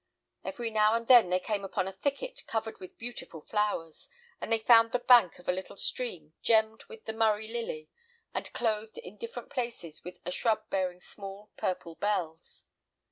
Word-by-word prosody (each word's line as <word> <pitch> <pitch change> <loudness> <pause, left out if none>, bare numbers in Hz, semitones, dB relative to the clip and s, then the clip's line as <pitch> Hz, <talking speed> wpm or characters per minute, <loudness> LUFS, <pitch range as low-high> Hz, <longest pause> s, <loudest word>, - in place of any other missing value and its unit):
Every 240 -5 -3
now 215 0 +4
and 230 0 -1
then 240 -8 +8
they 180 0 +3
came 205 +1 -2
upon 190 -1 -1
a - - -3
thicket 295 - -2
covered 220 0 -3
with 185 - -11
beautiful 235 -8 -6
flowers, 205 -5 -2 0.3
and - - -4
they 225 - +5
found 230 0 +6
the - - +4
bank 245 -7 +6
of 180 - -17
a - - +4
little 190 +2 -5
stream 180 -14 -3
gemmed 220 0 +3
with 450 -1 -12
the 220 - -3
Murray 220 -1 +2
lily, 225 -10 -4 0.5
and - - -3
clothed 220 -2 -1
in 190 +4 -9
different 230 +3 -7
places 235 - -4
with 180 +1 -9
a 180 - -2
shrub 215 +2 +1
bearing 180 -2 -1
small 200 +2 -10
purple 175 -2 -2
bells. 175 -4 -3
215 Hz, 180 wpm, -30 LUFS, 185-230 Hz, 0.5 s, then